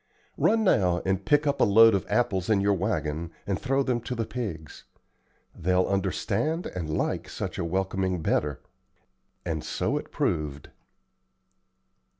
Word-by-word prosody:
Run 225 Hz, 0 st, +3 dB
now 90 Hz, -, +2 dB
and 95 Hz, 0 st, 0 dB
pick 145 Hz, +7 st, +3 dB
up 140 Hz, -, 0 dB
a -, -, +7 dB
load 115 Hz, +2 st, +7 dB
of 100 Hz, -, -1 dB
apples 95 Hz, -5 st, 0 dB
in 105 Hz, -3 st, +4 dB
your 100 Hz, +1 st, +3 dB
wagon 85 Hz, -5 st, -2 dB, 0.2 s
and 100 Hz, -2 st, -2 dB
throw 135 Hz, +1 st, +1 dB
them 125 Hz, -3 st, 0 dB
to 125 Hz, +2 st, -4 dB
the 115 Hz, -1 st, -2 dB
pigs. 100 Hz, -, -6 dB, 0.7 s
They'll 90 Hz, +2 st, +1 dB
understand 100 Hz, -, -1 dB
and 85 Hz, -4 st, -5 dB
like -, -, -2 dB
such -, -, -5 dB
a -, -, 0 dB
welcoming 95 Hz, 0 st, -1 dB
better;" 75 Hz, -2 st, 0 dB, 0.8 s
and 80 Hz, -3 st, -2 dB
so -, -, -1 dB
it -, -, -11 dB
proved. 75 Hz, -2 st, -2 dB
95 Hz, 150 wpm, -27 LUFS, 85-115 Hz, 0.8 s, a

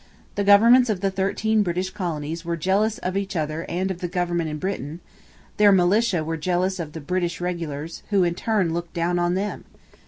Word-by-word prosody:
The 205 Hz, -, -1 dB
governments 230 Hz, +5 st, +6 dB
of 200 Hz, -4 st, -1 dB
the 195 Hz, -1 st, +1 dB
thirteen 210 Hz, +3 st, +1 dB
British 185 Hz, 0 st, -1 dB
colonies 165 Hz, -4 st, -4 dB
were 170 Hz, -1 st, -2 dB
jealous 200 Hz, +6 st, +1 dB
of 185 Hz, +1 st, -4 dB
each 195 Hz, -1 st, -2 dB
other 155 Hz, 0 st, -2 dB
and 185 Hz, +2 st, -1 dB
of 180 Hz, -, -6 dB
the 180 Hz, -, -3 dB
government 175 Hz, -2 st, -1 dB
in 150 Hz, -, -4 dB
Britain; 165 Hz, -3 st, -4 dB, 0.6 s
their 210 Hz, -1 st, +6 dB
militia 190 Hz, 0 st, +3 dB
were 165 Hz, +1 st, -3 dB
jealous 180 Hz, +3 st, 0 dB
of 155 Hz, -3 st, -5 dB
the 160 Hz, -, -7 dB
British 175 Hz, +2 st, -2 dB
regulars, 165 Hz, -3 st, -4 dB
who 200 Hz, -3 st, +3 dB
in 170 Hz, -1 st, +1 dB
turn 190 Hz, -3 st, 0 dB
looked 170 Hz, +1 st, -5 dB
down 175 Hz, +1 st, 0 dB
on 175 Hz, +1 st, +1 dB
them. 205 Hz, +2 st, -3 dB
180 Hz, 195 wpm, -23 LUFS, 170-195 Hz, 0.6 s, governments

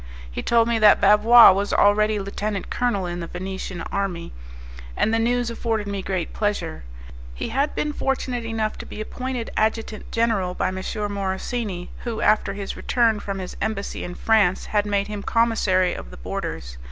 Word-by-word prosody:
He -, -, -4 dB
told 230 Hz, -1 st, +3 dB
me 235 Hz, -1 st, +1 dB
that 210 Hz, -1 st, +7 dB
Bavois 210 Hz, +4 st, +8 dB
was 200 Hz, +1 st, -1 dB
already 210 Hz, +1 st, +3 dB
lieutenant 200 Hz, 0 st, -4 dB
colonel 240 Hz, -6 st, 0 dB
in 175 Hz, 0 st, -4 dB
the 170 Hz, -, -5 dB
Venetian 190 Hz, 0 st, -5 dB
army, 185 Hz, -, -3 dB, 0.6 s
and 220 Hz, -, +2 dB
the 225 Hz, -, +3 dB
news 240 Hz, +1 st, +1 dB
afforded 225 Hz, -2 st, -2 dB
me 200 Hz, -1 st, -3 dB
great 185 Hz, -3 st, -3 dB
pleasure. 205 Hz, -, -2 dB, 0.5 s
He -, -, -4 dB
had 275 Hz, +5 st, 0 dB
been 300 Hz, 0 st, -1 dB
fortunate 255 Hz, -3 st, -2 dB
enough 225 Hz, -1 st, -2 dB
to -, -, -8 dB
be -, -, -8 dB
appointed 250 Hz, +2 st, -4 dB
adjutant 220 Hz, 0 st, -1 dB
general 215 Hz, -6 st, 0 dB
by -, -, 0 dB
M. 185 Hz, -, -5 dB, 0.4 s
Morosini, 195 Hz, 0 st, -3 dB
who, 235 Hz, -3 st, -4 dB
after 210 Hz, -2 st, +2 dB
his 200 Hz, -1 st, -5 dB
return 230 Hz, -3 st, +1 dB
from 200 Hz, -1 st, -4 dB
his 185 Hz, -1 st, -6 dB
embassy 215 Hz, -2 st, -3 dB
in 175 Hz, -, -6 dB
France, 205 Hz, -4 st, +2 dB
had 210 Hz, -1 st, 0 dB
made 200 Hz, -1 st, +1 dB
him 210 Hz, -1 st, -5 dB
Commissary 200 Hz, -5 st, +2 dB
of -, -, -8 dB
the -, -, -11 dB
Borders. -, -, -5 dB
210 Hz, 175 wpm, -23 LUFS, 190-230 Hz, 0.6 s, Bavois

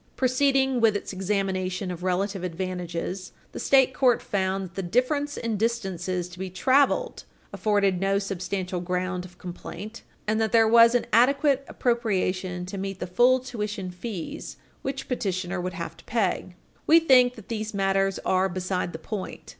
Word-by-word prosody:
Proceeding 265 Hz, 0 st, +2 dB
with 220 Hz, -2 st, +4 dB
its 205 Hz, -, -4 dB
examination 190 Hz, -1 st, -1 dB
of 175 Hz, -1 st, -7 dB
relative 185 Hz, +1 st, -1 dB
advantages, 180 Hz, 0 st, -4 dB, 0.2 s
the -, -, -7 dB
state 265 Hz, -1 st, +4 dB
court 250 Hz, -3 st, +3 dB
found 195 Hz, -1 st, -1 dB
that -, -, -26 dB
the 195 Hz, -, -3 dB
difference 255 Hz, -, 0 dB
in 230 Hz, -2 st, -2 dB
distances 190 Hz, -5 st, -1 dB
to 180 Hz, 0 st, -13 dB
be 190 Hz, 0 st, -4 dB
traveled 275 Hz, -, +2 dB, 0.3 s
afforded 200 Hz, -3 st, +1 dB
no 195 Hz, +1 st, +2 dB
substantial 185 Hz, -2 st, -3 dB
ground 180 Hz, +1 st, -2 dB
of 180 Hz, -1 st, -15 dB
complaint, 205 Hz, +5 st, -8 dB, 0.2 s
and 215 Hz, +1 st, +1 dB
that 220 Hz, -, +1 dB
there 225 Hz, -1 st, +5 dB
was 230 Hz, +1 st, +7 dB
an 245 Hz, -, +2 dB
adequate 275 Hz, +3 st, +4 dB
appropriation 185 Hz, -6 st, -1 dB
to 195 Hz, +2 st, -6 dB
meet 195 Hz, -1 st, -4 dB
the -, -, -3 dB
full 245 Hz, +8 st, +4 dB
tuition 210 Hz, -6 st, -4 dB
fees 180 Hz, -1 st, -6 dB, 0.2 s
which 270 Hz, 0 st, -4 dB
petitioner 190 Hz, -6 st, -2 dB
would 180 Hz, +1 st, -3 dB
have 170 Hz, -3 st, -6 dB
to -, -, -17 dB
pay. 190 Hz, -5 st, -1 dB, 0.3 s
We 325 Hz, +2 st, +8 dB
think 250 Hz, -6 st, +5 dB
that 220 Hz, -5 st, -13 dB
these 215 Hz, -1 st, -4 dB
matters 195 Hz, 0 st, +1 dB
are 190 Hz, +1 st, +2 dB
beside 185 Hz, 0 st, -2 dB
the -, -, -4 dB
point. 190 Hz, +4 st, -6 dB
195 Hz, 160 wpm, -26 LUFS, 185-235 Hz, 0.3 s, We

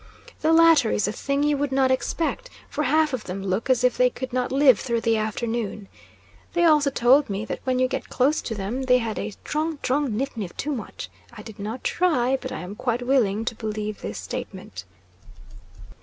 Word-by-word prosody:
The 315 Hz, -, +3 dB
latter 325 Hz, -7 st, +6 dB
is 210 Hz, -, +1 dB
a -, -, -1 dB
thing 280 Hz, +5 st, -1 dB
you 295 Hz, -1 st, +2 dB
would 285 Hz, -1 st, -1 dB
not 265 Hz, -1 st, +3 dB
expect, 325 Hz, -, -1 dB, 0.2 s
for 300 Hz, -, -1 dB
half 305 Hz, +1 st, +2 dB
of 255 Hz, -, -3 dB
them 190 Hz, +1 st, -5 dB
look 195 Hz, +6 st, -2 dB
as 255 Hz, -1 st, +3 dB
if 250 Hz, -1 st, +2 dB
they 250 Hz, 0 st, +4 dB
could 255 Hz, 0 st, -7 dB
not 250 Hz, -1 st, -1 dB
live 265 Hz, -5 st, +5 dB
through 235 Hz, -3 st, -1 dB
the 225 Hz, 0 st, +2 dB
afternoon. 220 Hz, -1 st, -3 dB, 0.6 s
They 345 Hz, -, +2 dB
also 300 Hz, -4 st, +5 dB
told 265 Hz, +1 st, +4 dB
me 200 Hz, +2 st, -3 dB
that -, -, -4 dB
when 255 Hz, -1 st, +1 dB
you 255 Hz, 0 st, +3 dB
got 255 Hz, -, -4 dB
close 275 Hz, +5 st, +2 dB
to 225 Hz, -, -4 dB
them, 210 Hz, +6 st, -3 dB
they 255 Hz, -1 st, +4 dB
had 225 Hz, -3 st, -3 dB
a 215 Hz, -, -4 dB
"'trong, 310 Hz, +1 st, -2 dB
'trong 280 Hz, +2 st, +1 dB
'niff; 275 Hz, +3 st, -2 dB
'niff 200 Hz, -6 st, -6 dB
too 300 Hz, -, -2 dB
much." 235 Hz, -, -6 dB, 0.3 s
I -, -, -9 dB
did 220 Hz, -3 st, -11 dB
not 220 Hz, +5 st, -5 dB
try, 270 Hz, -8 st, +2 dB
but -, -, -6 dB
I -, -, -5 dB
am 180 Hz, +2 st, -7 dB
quite 245 Hz, +2 st, -2 dB
willing 225 Hz, -5 st, +2 dB
to 235 Hz, -, -1 dB
believe 215 Hz, -1 st, -4 dB
this 100 Hz, -, -5 dB
statement. 90 Hz, 0 st, -7 dB
250 Hz, 210 wpm, -24 LUFS, 215-280 Hz, 0.6 s, latter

